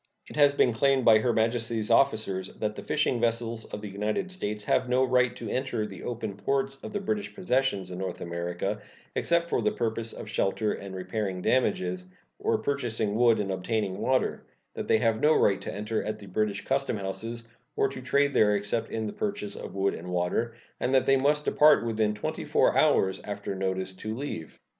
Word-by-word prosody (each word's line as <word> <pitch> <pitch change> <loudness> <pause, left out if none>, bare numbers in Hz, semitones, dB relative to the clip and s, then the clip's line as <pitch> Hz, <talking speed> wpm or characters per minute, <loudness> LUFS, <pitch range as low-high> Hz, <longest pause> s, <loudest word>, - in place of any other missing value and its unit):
It - - -10
has 145 -1 +5
been 125 -4 +3
claimed 135 +2 +2
by 110 -1 +7
Her 120 +3 +1
Majesty's 115 -1 0
officers 110 -6 +3
that 105 -1 -2
the - - -6
fishing 150 -5 0
vessels 115 -1 0
of 105 - -7
the - - -4
United 105 - -2
States 105 - -3
have 125 - +1
no 125 +1 +3
right 125 -1 +2
to - - -7
enter 130 -4 -1
the 95 -4 -9
open 115 -4 -4
ports 135 +4 -1
of - - -6
the 205 - -2
British 210 +1 -3
possessions 130 - 0
in 90 - -6
North 95 -2 -4
America, 85 0 -3 0.3
except 170 0 +2
for - - 0
the 215 - +2
purposes 115 - -3
of - - -7
shelter 105 +1 0
and 100 -1 -7
repairing 95 -1 -3
damages, 90 -8 +1 0.4
of - - +1
purchasing 115 -7 -1
wood 115 0 +4
and 100 -2 -1
obtaining 95 0 -2
water; 130 +4 +1 0.3
that - - -5
they - - +4
have 110 0 +1
no 155 +1 +5
right 100 -1 +3
to - - -4
enter 105 +2 -2
at 105 +1 -3
the 105 - -11
British 100 +1 -2
custom 135 -4 0
houses 115 +4 -5 0.3
or - - +3
to 135 -1 -7
trade 140 +2 +2
there 105 -1 +4
except 105 +3 -1
in 110 -1 -3
the 105 - -4
purchase 200 - -3
of - - -8
wood 100 0 +1
and 85 - -8
water, 90 +6 -1 0.2
and 130 - +1
that 130 - +4
they 135 - +5
must 145 +3 +2
depart 150 -4 +5
within 110 -2 0
twenty 105 - -4
four - - +3
hours 95 0 +3
after 100 -1 -4
notice 95 0 -2
to 110 +3 -5
leave. 120 - -6
110 Hz, 200 wpm, -28 LUFS, 100-130 Hz, 0.4 s, by